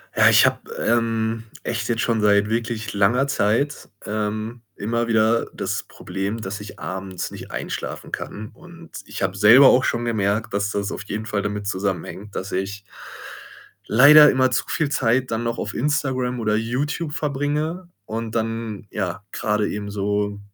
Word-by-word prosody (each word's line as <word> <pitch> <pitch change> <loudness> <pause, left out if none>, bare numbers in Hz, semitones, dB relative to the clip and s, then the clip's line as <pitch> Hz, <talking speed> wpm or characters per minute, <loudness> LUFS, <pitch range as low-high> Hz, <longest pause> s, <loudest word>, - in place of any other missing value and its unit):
Ja, - - +6
ich - - +6
habe, - - -1
ähm, 115 -1 0 0.2
echt 115 -1 -3
jetzt 115 0 0
schon 115 -2 +1
seit 105 0 +4
wirklich 110 -1 -2
langer 105 +7 +3
Zeit, 140 +4 0 0.2
ähm, 110 +2 -3
immer 115 +3 -1
wieder 115 0 +2
das - - -2
Problem, 100 +4 -5
dass 100 0 -5
ich 105 - -10
abends 95 0 -5
nicht - - -9
einschlafen - - -5
kann 110 +1 -6
und 170 -1 -15
ich - - -5
habe 95 0 -1
selber 115 +7 +8
auch 130 +1 +4
schon 120 0 -1
gemerkt, 105 -1 0
dass 100 0 0
das 100 -1 -2
auf - - -5
jeden 110 +1 -4
Fall 100 -2 -1
damit 105 0 -3
zusammenhängt, 100 +1 -3
dass 95 - -4
ich 100 +2 -3 1.0
leider 145 +5 +8
immer 130 0 +2
zu - - 0
viel 155 -3 0
Zeit 130 -2 +1
dann 115 +1 -1
noch 115 0 -2
auf - - -4
Instagram 130 -3 -1
oder 105 -2 +1
YouTube 145 +8 -2
verbringe 150 +4 -2 0.2
und 115 +1 -5
dann, 115 -1 -3
ja, 95 0 -3
grade 105 -1 0
eben 105 0 -4
so 100 0 -1
110 Hz, 165 wpm, -22 LUFS, 105-125 Hz, 1.0 s, selber